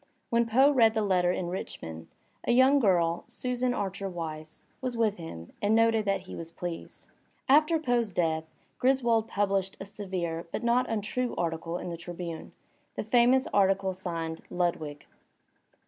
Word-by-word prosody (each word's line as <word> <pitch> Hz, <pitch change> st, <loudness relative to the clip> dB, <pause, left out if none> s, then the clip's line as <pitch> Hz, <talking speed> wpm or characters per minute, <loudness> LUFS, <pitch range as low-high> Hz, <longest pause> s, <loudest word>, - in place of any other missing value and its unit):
When 235 Hz, 0 st, +3 dB
Poe 265 Hz, +6 st, +5 dB
read 230 Hz, -5 st, +4 dB
the 220 Hz, -, +1 dB
letter 180 Hz, -3 st, +2 dB
in 180 Hz, -1 st, -2 dB
Rich 185 Hz, -, -4 dB
mond, 80 Hz, 0 st, -7 dB, 0.4 s
a -, -, +1 dB
young 260 Hz, +3 st, +6 dB
girl, 175 Hz, -7 st, +2 dB
Susan 250 Hz, +1 st, -1 dB
Archer 195 Hz, -3 st, -3 dB
Weiss, 155 Hz, -3 st, -6 dB, 0.2 s
was 250 Hz, -2 st, -3 dB
with 220 Hz, -3 st, +1 dB
him 85 Hz, -, -8 dB
and 205 Hz, +2 st, +3 dB
noted 225 Hz, -1 st, +3 dB
that 195 Hz, -1 st, +1 dB
he 185 Hz, -, -9 dB
was 165 Hz, 0 st, -7 dB
pleased. 170 Hz, 0 st, -7 dB, 0.4 s
After 305 Hz, +4 st, +5 dB
Poe's 245 Hz, -7 st, +1 dB
death 160 Hz, -3 st, 0 dB, 0.3 s
Griswold 240 Hz, -4 st, +3 dB
published 195 Hz, -2 st, 0 dB
a -, -, -6 dB
severe 180 Hz, -5 st, -4 dB
but -, -, -3 dB
not 240 Hz, +2 st, +2 dB
untrue 225 Hz, +3 st, -1 dB
article 165 Hz, 0 st, -2 dB
in 180 Hz, -, -5 dB
the 170 Hz, -, -5 dB
Tribune, 170 Hz, -1 st, -7 dB, 0.4 s
the -, -, -2 dB
famous 245 Hz, +4 st, +4 dB
article 195 Hz, -1 st, +3 dB
signed 165 Hz, -3 st, -4 dB
""Lud 175 Hz, -1 st, +1 dB
wig." 145 Hz, -2 st, -8 dB
195 Hz, 165 wpm, -29 LUFS, 170-235 Hz, 0.4 s, young